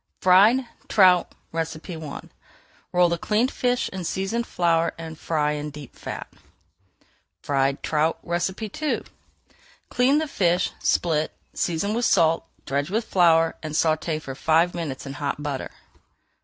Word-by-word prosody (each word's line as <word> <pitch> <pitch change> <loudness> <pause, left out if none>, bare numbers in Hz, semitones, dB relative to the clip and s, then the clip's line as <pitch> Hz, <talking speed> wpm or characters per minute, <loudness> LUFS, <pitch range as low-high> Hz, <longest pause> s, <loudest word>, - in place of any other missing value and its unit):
FRIED 205 +8 +5 0.2
TROUT 185 -4 +5 0.2
I 160 -1 -5 0.7
Roll 180 -1 +4
the 170 0 -1
cleaned 220 +7 +1
fish 245 0 0
in 190 -2 -6
seasoned 195 +7 -2
flour 170 -1 +1
and 165 -1 -7
fry 150 -1 0
in 150 0 -3
deep 145 -2 -11
fat. - - -6 1.2
FRIED 140 -1 0
TROUT 155 +1 +1
II 190 - -2 0.9
Clean 255 +4 +3
the 315 0 0
fish, 180 -8 +1
split, 155 -3 +1 0.2
season 175 +5 -1
with 235 +1 0
salt, 165 -5 +3 0.2
dredge 140 +2 -1
with 220 +3 -1
flour, 165 -4 +4
and 155 -1 -5
sauté 155 0 +1
for 135 -3 -7
five 165 +5 +2
minutes 150 -7 -5
in 135 - -6
hot 145 0 -3
butter. 140 -3 -3
165 Hz, 130 wpm, -24 LUFS, 155-190 Hz, 1.2 s, FRIED